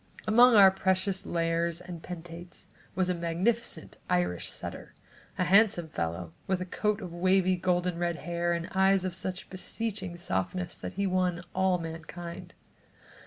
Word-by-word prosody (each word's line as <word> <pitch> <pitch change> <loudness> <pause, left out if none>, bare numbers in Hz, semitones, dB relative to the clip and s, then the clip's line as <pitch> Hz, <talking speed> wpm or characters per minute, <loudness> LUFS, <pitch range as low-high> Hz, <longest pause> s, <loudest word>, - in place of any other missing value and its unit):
Among 240 +3 +7
our 195 -2 +9
precious 190 +1 0
lares 170 0 0
and 180 -2 -8
penates, 175 +1 -9 0.3
was 185 -1 +1
a 180 - +1
magnificent 175 +7 -1
Irish 90 -1 0
setter, - - -7 0.4
a 185 - +2
handsome 190 -3 +4
fellow 85 - -3
with 190 -1 +1
a 185 - -3
coat 210 +3 -1
of 180 -3 -7
wavy 185 +1 +3
golden 180 -1 0
red 175 -1 0
hair 175 +1 -2
and 170 0 -2
eyes 190 0 +4
of 185 - -2
such 185 +1 -3
beseeching 195 -1 -4
softness 175 - -2
that - - -6
he 200 0 -1
won 180 -2 0
all 190 -1 +2
mankind. 165 +1 -7
180 Hz, 150 wpm, -29 LUFS, 170-190 Hz, 0.4 s, our